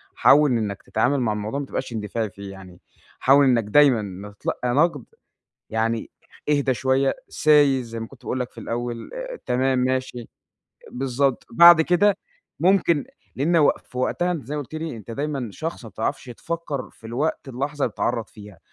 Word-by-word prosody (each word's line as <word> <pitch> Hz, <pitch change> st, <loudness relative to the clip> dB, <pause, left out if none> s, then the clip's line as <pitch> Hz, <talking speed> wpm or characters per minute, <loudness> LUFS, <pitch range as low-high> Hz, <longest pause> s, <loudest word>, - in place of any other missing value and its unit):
حاول 150 Hz, -1 st, +5 dB
إنَّك 105 Hz, -4 st, -1 dB
تتعامل 140 Hz, +2 st, +1 dB
مع 110 Hz, -3 st, +1 dB
الموضوع 105 Hz, +6 st, -3 dB
ما 140 Hz, -, -4 dB
تبقاش 120 Hz, -, -5 dB
اندفاعي 110 Hz, 0 st, -3 dB
فيه 100 Hz, +1 st, -10 dB
يعني، 95 Hz, -2 st, -13 dB, 0.4 s
حاول 140 Hz, +1 st, +5 dB
إنَّك 120 Hz, -3 st, +3 dB
دايمًا 135 Hz, +1 st, +5 dB
لما 100 Hz, 0 st, -7 dB
تتلقى 120 Hz, +4 st, -3 dB
نقد 150 Hz, -3 st, +2 dB, 0.7 s
يعني 115 Hz, 0 st, -1 dB, 0.4 s
اهدى 140 Hz, -3 st, +2 dB
شوية، 135 Hz, +2 st, +1 dB, 0.2 s
سايس 145 Hz, -4 st, +4 dB
زي 115 Hz, 0 st, -6 dB
ما 115 Hz, -, -6 dB
كنت 135 Hz, -, -17 dB
باقول 130 Hz, -, -3 dB
لَك 125 Hz, -, -3 dB
في -, -, -29 dB
الأول، 120 Hz, 0 st, -5 dB
آآ، -, -, -6 dB
تمام، 130 Hz, +1 st, +1 dB
ماشي، 130 Hz, -2 st, -2 dB, 0.6 s
بالضبط. 135 Hz, +1 st, -1 dB
بعد 170 Hz, -1 st, +8 dB
كده 185 Hz, +5 st, +3 dB, 0.4 s
ممكن 170 Hz, -5 st, +3 dB, 0.3 s
لأن 165 Hz, +6 st, +2 dB
و 150 Hz, -, +5 dB
في 125 Hz, -, -11 dB
وقتها 175 Hz, +7 st, 0 dB
أنت 155 Hz, -9 st, -4 dB
زي 150 Hz, +3 st, -4 dB
ما 145 Hz, -, -2 dB
قُلت 150 Hz, +4 st, -10 dB
لي، 155 Hz, -6 st, -4 dB
أنت 110 Hz, +2 st, -10 dB
دايمًا 140 Hz, -3 st, -3 dB
شخص 160 Hz, -, -6 dB
ما -, -, -8 dB
بتعرفش 110 Hz, +6 st, -3 dB
تفكَّر 150 Hz, 0 st, -5 dB
في 110 Hz, -, -14 dB
الوقت 135 Hz, +3 st, -2 dB
اللحظة 140 Hz, +3 st, -3 dB
اللي 120 Hz, -, -3 dB
بتتعرَّض 115 Hz, 0 st, -1 dB
فيها، 105 Hz, -5 st, -14 dB
130 Hz, 175 wpm, -23 LUFS, 115-150 Hz, 0.7 s, بعد